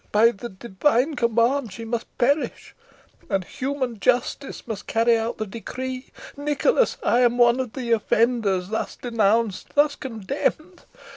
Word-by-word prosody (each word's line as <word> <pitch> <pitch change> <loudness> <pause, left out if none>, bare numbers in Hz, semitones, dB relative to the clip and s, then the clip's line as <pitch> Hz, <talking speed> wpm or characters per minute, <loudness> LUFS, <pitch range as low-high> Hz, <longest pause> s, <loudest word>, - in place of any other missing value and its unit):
By 225 +3 +5
the 240 +2 -8
divine 240 +8 0
command 235 0 +1
she 225 +4 -8
must 235 +1 -3
perish, 285 +5 0 0.6
and 195 -3 0
human 260 +1 -3
justice 250 +4 0
must; 220 -4 -6
carry 230 +1 +3
out 225 +1 -2
the 215 - -2
decree. 255 +5 -6 0.3
Nicholas, 295 - +1
I 240 - +3
am 245 -1 +3
one 240 +1 +5
of 255 -4 -3
the 245 -3 -4
offenders 220 -4 +1
thus 220 - -3
denounced, 225 -3 0
thus 290 0 +4
condemned. 275 - -3
235 Hz, 140 wpm, -24 LUFS, 225-260 Hz, 0.6 s, By